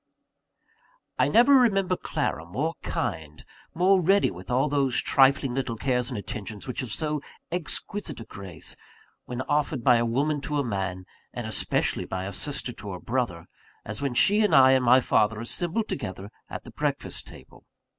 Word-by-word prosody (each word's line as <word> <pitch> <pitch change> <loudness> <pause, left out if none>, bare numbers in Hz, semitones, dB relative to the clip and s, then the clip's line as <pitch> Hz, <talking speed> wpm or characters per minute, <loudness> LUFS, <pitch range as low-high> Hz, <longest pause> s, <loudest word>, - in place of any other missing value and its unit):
I - - +4
never 245 +5 +5
remember 195 -8 +4
Clara 80 - -2
more 140 - -2
kind, 75 -1 -4 0.3
more 185 +2 +4
ready 195 +4 +3
with 90 +2 -11
all 130 +4 +2
those 140 -3 +1
trifling 135 -1 +3
little 125 -3 -2
cares 125 +1 0
and 125 - -4
attentions 105 +1 -6
which 125 - -4
have 125 -4 -4
so 150 +3 -1 0.3
exquisite 175 - -2
a - - -7
grace, 95 -6 -8 0.5
when 125 +1 -4
offered 145 -3 -1
by 125 0 +6
a 115 - +1
woman 145 +5 0
to 150 +1 -3
a 140 - +1
man, 95 -5 -3 0.3
and - - -4
especially - - 0
by 95 0 -4
a 100 - -5
sister 140 +2 -2
to 105 -3 -8
a 90 - -7
brother, 115 -9 -2 0.4
as 110 +4 -4
when 140 -3 -2
she 205 - +5
and 210 - +3
I 130 -1 +8
and 130 -1 +3
my 125 +2 +6
father 110 -2 +2
assembled 175 - -1
together 95 -4 -5 0.2
at - - -7
the - - -12
breakfast - - -3
table. - - -15
130 Hz, 175 wpm, -26 LUFS, 105-150 Hz, 0.5 s, I